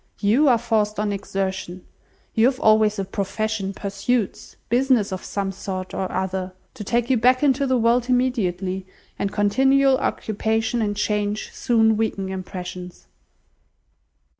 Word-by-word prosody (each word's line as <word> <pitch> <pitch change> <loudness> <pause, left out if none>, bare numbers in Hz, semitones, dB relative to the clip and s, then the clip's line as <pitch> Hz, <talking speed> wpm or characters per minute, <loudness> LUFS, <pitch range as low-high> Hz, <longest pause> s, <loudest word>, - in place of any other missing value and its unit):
You 230 +9 +3
are 245 -3 +5
forced 215 -3 0
on 210 -1 0
exertion. 190 -2 -4 0.5
You 225 +2 +4
have 260 -1 -1
always 215 -1 +4
a 195 - -2
profession, 200 +1 -2
pursuits, 200 +3 -2
business 245 -3 +2
of 185 - -5
some 195 -1 -3
sort 185 -1 -6
or 190 - -3
other, 185 0 -3 0.2
to 230 - -7
take 240 +4 0
you 255 - +4
back 255 +4 +3
into 275 -1 +2
the 260 -1 +2
world 240 +1 +2
immediately, 190 -7 0 0.3
and 200 - -1
continual 265 +6 +3
occupation 225 -1 -1
and 205 -1 -1
change 210 0 -1
soon 225 -2 +2
weaken 200 -3 -1
impressions." 180 -1 -7
210 Hz, 140 wpm, -22 LUFS, 195-240 Hz, 0.5 s, are